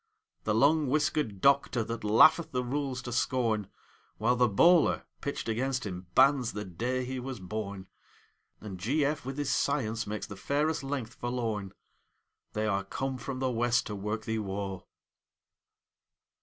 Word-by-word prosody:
The 105 - +1
long 145 +5 +4
whiskered 135 -7 0
Doctor, 140 -4 +3
that 115 0 -5
laugheth 155 +10 +6
the 125 -1 -1
rules 130 0 -2
to 120 - -5
scorn, 115 -4 0 0.5
While 120 +3 +2
the 125 -1 +3
bowler, 170 - +4 0.2
pitched 140 - -4
against 125 +3 -1
him, 90 -2 -6
bans 135 -4 +4
the 105 0 -4
day 125 +8 -2
he 130 +1 -4
was 130 -2 -5
born; 100 0 -5 0.7
And 100 -4 -8
G.F. 145 - 0
with 135 +1 -4
his 145 -2 -1
science 115 -6 0
makes 105 +1 -4
the 100 - -9
fairest 145 +8 0
length 135 -4 -4
forlorn; 115 -5 -3 0.8
They 110 0 -1
are 100 -2 0
come 130 +6 -4
from 130 +2 -5
the 130 0 0
West 120 0 +1
to 105 - -5
work 105 +2 -3
thee 110 0 -1
woe! 95 -2 -4
120 Hz, 155 wpm, -30 LUFS, 105-135 Hz, 0.8 s, laugheth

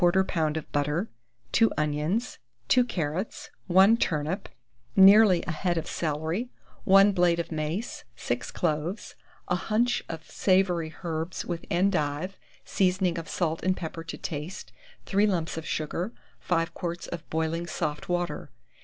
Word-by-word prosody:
of 165 -4 +1
butter, 150 +8 -1 0.4
2 225 - +4
onions, 150 +10 -1 0.3
2 250 - +6
carrots, 175 -2 -3 0.2
1 190 +5 +6
turnip, 160 0 -1 0.5
nearly 195 -1 +7
a - - -2
head 175 +2 -1
of 165 - -2
celery, 160 +9 -2 0.4
1 195 +1 +7
blade 175 -3 +3
of 170 - -3
mace, 160 +8 -3
6 120 +1 -3
cloves, 170 +4 -2 0.3
a - - 0
hunch 230 +6 +1
of 160 -1 -7
savoury 185 -4 +2
herb 165 +1 -4
with 170 -1 -4
endive, 175 -1 0 0.3
seasoning 185 -2 +1
of 165 - -8
salt 165 -2 -1
and 185 0 +1
pepper 165 -1 -5
to 165 - -7
taste, 155 +4 -6 0.3
3 205 +1 +3
lumps 170 -5 -1
of 160 -1 -6
sugar, 170 +6 -2 0.3
5 165 -1 0
quarts 175 -1 -4
of 170 -1 -7
boiling 160 +2 -1
soft 155 -2 -3
water. 175 -5 -2
175 Hz, 135 wpm, -27 LUFS, 160-190 Hz, 0.5 s, nearly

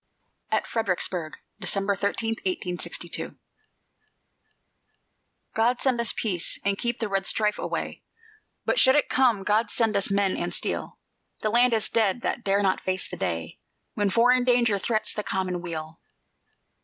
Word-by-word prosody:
AT - - 0
FREDERICKSBURG 180 -6 -1 0.2
[December 200 +1 +1
13, 205 +3 -1
1862] 180 -1 -3 2.2
God 235 +3 +2
send 255 -3 +1
us 235 - +2
peace, 185 -7 0
and 200 0 +1
keep 240 0 -1
red 195 -2 -1
strife 210 -1 +1
away; - - -4 0.6
But - - +1
should 260 +1 +6
it 295 - +2
come, 240 -7 +2
God 210 +2 +1
send 225 -2 +1
us 200 0 +2
men 195 -1 +1
and - - -1
steel! - - -1 0.4
The 215 - 0
land 240 +1 +4
is 220 -1 0
dead 220 0 +1
that 240 - -2
dare 200 +1 +1
not 190 -1 +1
face 185 -1 -2
the - - -7
day 80 -1 -4 0.3
When 205 -1 0
foreign 245 +4 +4
danger 240 -5 +3
threats 215 +2 0
the 210 - -3
common 185 -3 -2
weal. 160 -2 -6
205 Hz, 145 wpm, -26 LUFS, 190-235 Hz, 2.2 s, should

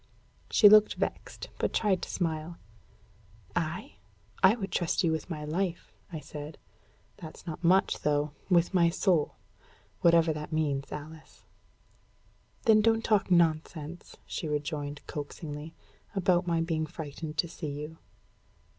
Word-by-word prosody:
She 210 - +7
looked 215 +1 +7
vexed, - - -4
but - - 0
tried 195 -4 +2
to - - -5
smile. 165 -1 -2 1.0
"I? 165 +2 -3 0.4
I 190 +3 +7
would 195 -5 -5
trust 175 +2 0
you 165 - +3
with 160 +3 -3
my 150 -3 -4
life," 175 +3 -2 0.2
I 160 - -4
said. 150 0 -8 0.6
"That's 165 -4 -10
not 165 0 -6
much, 185 +3 +3
though 150 0 +1 0.2
with 175 0 +3
my 170 -2 +5
soul, 170 -3 +1 0.6
whatever 165 -1 +4
that 150 +1 -6
means, 145 -3 -1
Alice." 155 +1 -10 1.2
"Then 220 -3 +6
don't 225 +1 +3
talk 210 -3 +2
nonsense," 165 -1 0
she 160 - -4
rejoined 145 -1 -3
coaxingly, 150 +1 -7 0.4
"about 180 -2 +2
my 165 -1 +1
being 160 -1 -1
frightened 150 0 -7
to 170 - +2
see 160 -2 -6
you." 150 +3 -7
165 Hz, 135 wpm, -29 LUFS, 150-180 Hz, 1.2 s, She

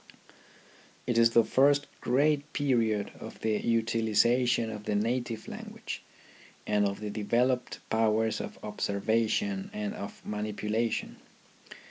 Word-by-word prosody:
It 120 - 0
is 115 0 +6
the 115 0 +5
first 140 +4 +3 0.2
great 145 +3 +1
period 115 -7 +1
of - - -9
the 110 -1 +1
utilization 115 +1 +2
of 105 -1 -7
the 105 -2 0
native 115 +1 -1
language, - - -7 0.6
and 105 -1 +2
of 100 +1 -4
developed 125 +4 0
powers 110 0 +2
of - - -7
observation 115 - 0
and 210 -1 -2
of 100 - -7
manipula 105 +2 -1
tion. - - -4
115 Hz, 115 wpm, -29 LUFS, 105-125 Hz, 0.6 s, is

